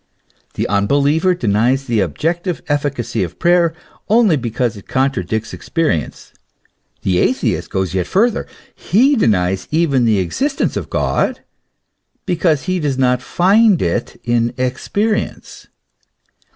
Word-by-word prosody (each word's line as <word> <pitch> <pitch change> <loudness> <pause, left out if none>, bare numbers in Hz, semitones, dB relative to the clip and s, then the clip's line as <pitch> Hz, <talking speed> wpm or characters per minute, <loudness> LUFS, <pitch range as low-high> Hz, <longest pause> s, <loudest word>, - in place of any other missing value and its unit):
The - - -1
unbeliever 145 - +2
denies 120 - +1
the 115 -4 0
objective 165 - -2
efficacy 145 -5 -1
of 85 -1 -4
prayer 175 -1 +3 0.4
only 215 -5 +4
because 120 -2 -2
it 100 - -13
contradicts 115 -4 -1
experience; 155 - -2 0.7
the 90 -2 +1
atheist - - 0
goes 95 -2 -2
yet 90 -2 -1
farther, 230 +4 +1 0.3
he 260 +10 +2
denies 95 - +1
even 150 -6 +2
the 110 -3 +3
existence 270 - -1
of - - -4
God, - - -1 0.8
because 165 -5 +1
he 185 -1 -1
does 145 -5 -1
not 125 -1 +2
find 195 - +3
it 120 0 -2
in 120 0 0
experience. 200 - -2
135 Hz, 120 wpm, -17 LUFS, 110-175 Hz, 0.8 s, only